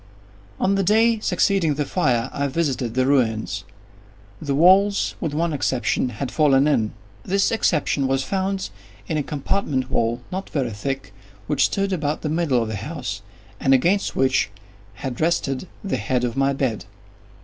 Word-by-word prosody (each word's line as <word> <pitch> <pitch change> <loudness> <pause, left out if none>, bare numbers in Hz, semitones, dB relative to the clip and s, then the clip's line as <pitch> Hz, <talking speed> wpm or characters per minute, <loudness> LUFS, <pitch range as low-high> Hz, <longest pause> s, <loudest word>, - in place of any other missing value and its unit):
On 195 - +2
the 195 - +2
day 220 +4 +3
succeeding 185 -5 +1
the 145 0 -1
fire, 130 -8 0
I 140 0 -1
visited 130 -6 -1
the 130 0 +2
ruins. 110 -7 +1 0.8
The 140 -2 -1
walls, 190 +6 +4
with 155 -4 -2
one 165 +1 0
exception, 130 -2 0
had 125 +1 -5
fallen 145 -2 +4
in. 110 -8 +1 0.3
This 195 - +1
exception 150 -10 +1
was 135 0 +1
found 190 - -2 0.4
in 155 - -1
a - - +1
compartment 140 -2 -2
wall, 115 +1 0
not 190 +1 -4
very 130 -6 -1
thick, 135 0 -4 0.3
which - - +2
stood 195 -1 0
about 150 -4 -2
the 155 - -1
middle 150 -7 +1
of - - -4
the 110 - -3
house, 105 -5 -5 0.4
and 135 0 +4
against 180 +10 +1
which 130 -4 +2 0.5
had 130 -1 -5
rested 160 -2 0 0.2
the 195 -10 -1
head 125 +3 -1
of 120 -2 -1
my 135 0 +2
bed. 130 -5 -2
140 Hz, 160 wpm, -22 LUFS, 130-175 Hz, 0.8 s, walls